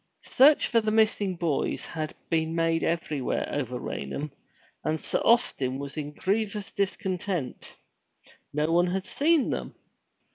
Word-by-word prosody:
Search 285 +3 +6
for 230 - +3
the 215 - 0
missing 215 -3 +2
boys 165 -4 -1
had 155 -1 -5
been 160 0 0
made 165 0 +1
everywhere 155 -5 -1
over 125 -4 -2
Raynham, 140 - -4 0.5
and 155 0 0
Sir - - -1
Austin 135 - +3
was 140 0 -6
in 150 -2 -4
grievous 205 +3 -1
discontent. 185 -6 -3 0.8
No 150 +2 0
one 175 +1 +4
had 190 +2 -2
seen 305 -1 +2
them. - - -4
170 Hz, 135 wpm, -27 LUFS, 150-205 Hz, 0.8 s, Search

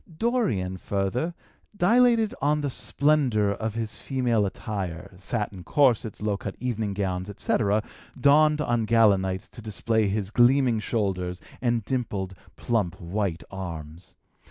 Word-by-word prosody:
Dorian, 120 - 0
further, 100 - -2 0.4
dilated 230 +3 +4
on 150 +2 +2
the 145 -2 -2
splendor 130 -9 +2
of 110 +1 -4
his 115 -2 -3
female 120 -6 0
attire, 95 -4 -5
satin 100 0 -4
corsets, 120 -6 +2
low 105 -2 0
cut 100 -1 -6
evening 110 -5 -2
gowns, 95 -1 -2
etc., 105 +1 +1 0.4
donned 150 +3 +5
on 120 -5 0
gala 110 -3 +5
nights 95 +1 -3
to - - -10
display 110 0 0
his 100 0 -2
gleaming 120 0 +4
shoulders 95 -5 -2 0.2
and 120 -3 0
dimpled, 105 -8 -2 0.2
plump, 105 -6 -1
white 90 -1 -2
arms. 85 -3 -8
110 Hz, 130 wpm, -26 LUFS, 95-125 Hz, 0.4 s, donned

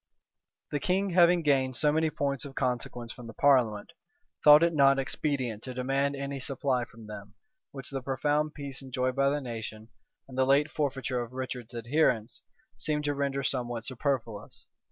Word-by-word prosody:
The 145 - 0
king, 190 +6 0
having 175 -1 +5
gained 135 -3 +2
so 150 +4 +3
many 160 +1 +2
points 140 -3 -2
of 135 -1 -9
consequence 125 -2 -2
from 125 -3 -10
the 115 - -10
parliament, 125 -7 +3 0.5
thought 150 +1 +9
it 170 0 +3
not 140 -2 +5
expedient 130 -5 -1
to 130 0 -7
demand 135 +2 0
any 140 0 -4
supply 130 -2 -1
from 115 -2 -14
them, 105 0 -10 0.4
which 135 -1 -8
the 135 -1 -3
profound 145 +4 0
peace 140 -2 -6
enjoyed 130 -1 -2
by 140 0 +3
the 145 +1 -1
nation, 110 -3 -7 0.4
and 130 - -11
the - - +5
late 140 +3 +3
forfeiture 135 -4 -1
of 120 +1 -7
Richard's 125 -2 -5
adherents, 120 -1 0 0.4
seemed 150 -1 -1
to 145 0 0
render 140 -1 -1
somewhat 120 -3 -2
superfluous. 125 -5 -3
135 Hz, 170 wpm, -29 LUFS, 125-145 Hz, 0.5 s, thought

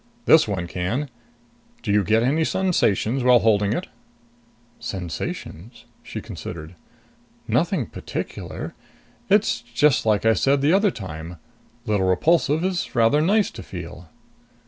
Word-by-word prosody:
"This - - +6
one 95 -4 -2
can. 100 - -3 0.7
Do 105 - -1
you 105 0 +3
get 110 +4 +2
any 150 +6 +2
sensations 135 - +1
while 125 -1 +6
holding 105 -3 +2
it?" 175 - -2 0.9
"Sensations?" 95 - -6 0.2
She - - -7
considered. 80 +1 -8 0.7
"Nothing - - +1
particular. - - -6 0.6
It's 120 - +3
just 120 +4 +2
like 105 0 +2
I 115 - +5
said 135 +4 +2
the 145 +4 +3
other 200 +2 +4
time 85 - -7 0.5
little 105 -4 +1
Repulsive 155 - +2
is 185 -6 -2
rather 120 +6 +4
nice 205 +6 +2
to - - -9
feel." 90 -2 -9
115 Hz, 125 wpm, -23 LUFS, 95-150 Hz, 0.9 s, This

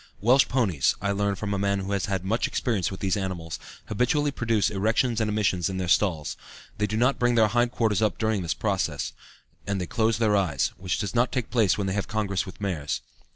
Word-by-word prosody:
Welsh 125 +5 +5
ponies, 105 - +1
I 100 +1 -1
learn 100 0 0
from 100 0 -3
a 100 - -1
man 100 0 +1
who 95 +1 -4
has 100 -1 0
had 95 -2 -2
much 115 +5 +1
experience 105 -8 -1
with 95 - -8
these 95 -2 +1
animals, 90 -6 -4 0.3
habitually 140 +7 +1
produce 115 -6 +1
erections 115 +4 +1
and 110 - +1
emissions 100 -4 +1
in 95 - -4
their 90 -1 -2
stalls; 85 -4 +1 0.4
they 105 - +2
do 110 +1 -2
not 125 +4 +2
bring 120 0 +3
their 110 -2 +5
hind 120 +2 +2
quarters 110 -4 +1
up 110 -2 +1
during 110 -3 0
this 80 -4 -2
process, - - -1 0.5
and 100 -1 -1
they 90 - -2
close 110 +2 +1
their 110 -2 +2
eyes, 85 -9 +1
which 95 -1 -2
does 100 - -3
not 120 +1 +2
take 125 -4 -2
place 110 -7 +3
when 100 - -1
they 95 - -1
have 100 0 -2
congress 100 -4 -1
with 95 - -10
mares. 85 -8 -2
100 Hz, 225 wpm, -26 LUFS, 95-115 Hz, 0.5 s, Welsh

